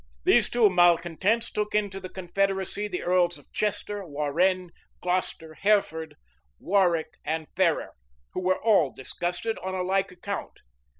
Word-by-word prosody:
These - - +5
two 240 -3 +4
malecontents 175 +5 +3
took 210 0 -2
into 200 -2 0
the 185 -1 -8
confederacy 195 +2 -1
the 180 -3 -4
earls 175 -1 +2
of - - -21
Chester, 205 -1 -2
Warrenne, 170 +4 0 0.3
Glocester, 180 -3 -2
Hereford, 160 -5 +1 0.4
Warwick, 175 - +1
and 160 +1 -2
Ferrers, 175 -4 +1 0.4
who - - -3
were 185 0 +1
all 200 -11 +3
disgusted 175 - -3
on 190 0 -4
a 185 - -1
like 190 +1 0
account. 190 +3 -6
185 Hz, 135 wpm, -26 LUFS, 170-200 Hz, 0.4 s, These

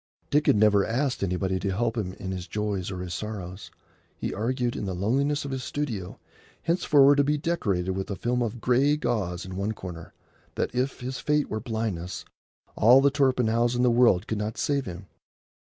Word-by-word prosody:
Dick 150 +1 +2
had - - +6
never 105 -1 +4
asked 130 +5 -1
anybody 95 0 -1
to 100 - -2
help 115 +4 0
him 95 -5 -3
in 95 0 -6
his 90 -1 -5
joys 105 -3 -2
or 90 -2 -5
his 90 -1 -5
sorrows. 95 -1 -6 0.5
He - - -3
argued, 120 +3 -1
in - - -3
the 95 -2 -3
loneliness 140 +10 0
of 140 - -4
his 130 -1 -3
studio, 115 -8 -4 0.4
henceforward 145 -5 +4
to 140 - +5
be 150 +2 +1
decorated 100 - -1
with 95 +1 -4
a 100 - -2
film 125 +5 -1
of 120 0 -2
gray 135 +6 +3
gauze 105 - -2
in 95 0 -7
one 100 +3 -1
corner, 85 -5 -9 0.4
that, - - -2
if 125 +2 -1
his 130 +1 -4
fate 150 -1 0
were 110 - -1
blindness, 110 -6 -4 0.5
all 120 +5 +7
the 140 +1 +4
Torpenhows 125 -4 +2
in 125 - +1
the 125 - +4
world 115 -5 +4
could 110 -2 -3
not 105 +1 -3
save 140 -4 0
him. 90 +2 -7
110 Hz, 195 wpm, -26 LUFS, 95-130 Hz, 0.5 s, all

